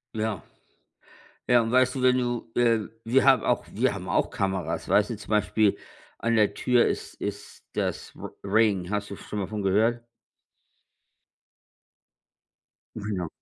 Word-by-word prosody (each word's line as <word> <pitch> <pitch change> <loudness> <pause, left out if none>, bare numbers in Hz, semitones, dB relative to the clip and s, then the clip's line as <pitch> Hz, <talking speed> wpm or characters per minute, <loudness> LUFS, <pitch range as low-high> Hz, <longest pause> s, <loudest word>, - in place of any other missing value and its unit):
Ja. 110 -4 -2 1.0
Ja 120 -1 +5
und 115 - -2
weißt 130 0 +4
du, 130 - -2
wenn 125 0 +4
du, 120 -2 -2
äh 115 -2 +3 0.2
wir 130 +4 +3
haben 135 -4 +5
auch - - +1
wir - - +1
haben - - -7
auch - - +1
Kameras. 95 -4 -2
Weißt 105 +3 +3
du 110 - -4
zum 105 - -13
Beispiel, 105 -1 +2 0.4
an 115 0 0
der 105 -2 +3
Tür 125 -1 +3
ist - - -4
ist 100 0 -6
das - - -3
R - - -8
Ring. 100 -3 +2
Hast 105 0 -2
du - - -4
schon 105 - -8
mal 100 - -1
davon 105 +2 -5
gehört? 110 +5 +2 2.9
Mhm, 105 -1 -4
ja. 90 - -3
110 Hz, 155 wpm, -26 LUFS, 100-120 Hz, 2.9 s, Ja